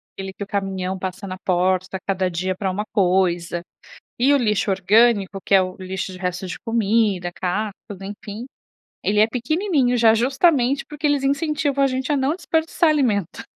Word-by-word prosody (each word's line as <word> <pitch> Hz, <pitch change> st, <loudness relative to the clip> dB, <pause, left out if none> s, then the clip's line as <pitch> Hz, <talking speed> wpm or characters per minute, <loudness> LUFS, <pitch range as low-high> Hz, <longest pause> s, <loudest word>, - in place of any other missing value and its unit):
aquele 195 Hz, 0 st, -6 dB
que 190 Hz, -, -19 dB
o 200 Hz, -, -3 dB
caminhão 190 Hz, -2 st, -2 dB
passa 190 Hz, +1 st, -5 dB
na 185 Hz, 0 st, -6 dB
porta, 185 Hz, +1 st, 0 dB
cada 190 Hz, -2 st, 0 dB
dia 185 Hz, +2 st, -2 dB
pra 190 Hz, 0 st, -2 dB
uma 205 Hz, +3 st, -3 dB
coisa. 180 Hz, -3 st, +1 dB, 0.6 s
E 265 Hz, +4 st, +4 dB
o -, -, +5 dB
lixo 210 Hz, -5 st, +1 dB
orgânico, 195 Hz, 0 st, +3 dB
que -, -, 0 dB
é 195 Hz, -, +7 dB
o 185 Hz, 0 st, -4 dB
lixo 190 Hz, 0 st, -5 dB
de -, -, -9 dB
resto 180 Hz, 0 st, -3 dB
de 180 Hz, -, -5 dB
comida, 215 Hz, -5 st, +1 dB
casca, 200 Hz, +4 st, -2 dB, 0.3 s
enfim, 205 Hz, +3 st, -7 dB, 0.6 s
ele 210 Hz, +1 st, +1 dB
é 215 Hz, -, +6 dB
pequenininho, 265 Hz, -, 0 dB
já 225 Hz, -2 st, +5 dB
justamente 270 Hz, +2 st, +2 dB
porque 300 Hz, 0 st, -5 dB
eles 290 Hz, -2 st, +2 dB
incentivam 285 Hz, 0 st, 0 dB
a -, -, +4 dB
gente 260 Hz, +1 st, -2 dB
a 290 Hz, -, +2 dB
não 270 Hz, +4 st, +1 dB
desperdiçar 325 Hz, -1 st, +1 dB
alimento. 235 Hz, -, 0 dB
205 Hz, 175 wpm, -22 LUFS, 185-265 Hz, 0.6 s, é